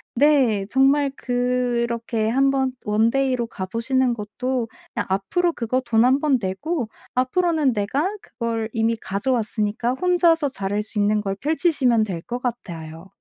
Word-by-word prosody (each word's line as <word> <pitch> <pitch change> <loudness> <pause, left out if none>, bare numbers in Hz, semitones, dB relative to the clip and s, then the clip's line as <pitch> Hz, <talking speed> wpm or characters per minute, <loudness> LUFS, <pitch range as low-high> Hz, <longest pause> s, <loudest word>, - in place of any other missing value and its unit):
네 255 -7 +3
정말 275 +2 +3
그렇게 240 -2 -1
한번 270 +1 +2
원데이 230 +5 +2
로 235 -2 -2
가 190 -4 -5
보시는 245 +5 0
것도 235 +3 -3 0.3
그냥 - - -1
앞으로 200 - +1
그거 250 0 -1
돈 230 0 +3
한 260 +2 +4
번 285 -3 +2
내고 240 - -2 0.3
앞으로는 295 +1 +2
내가 230 - 0
그걸 230 -2 -3
이미 225 0 +1
가져왔으니까, 220 +1 -1
혼자서 340 -2 +3
잘할 205 -3 -2
수 210 0 -5
있는 210 +1 +2
걸 195 -1 -2
펼치시면 290 -7 +2
될 180 -5 -5
것 245 +7 -5
같아요. 170 -9 -6
240 Hz, 290 characters per minute, -22 LUFS, 215-270 Hz, 0.3 s, 한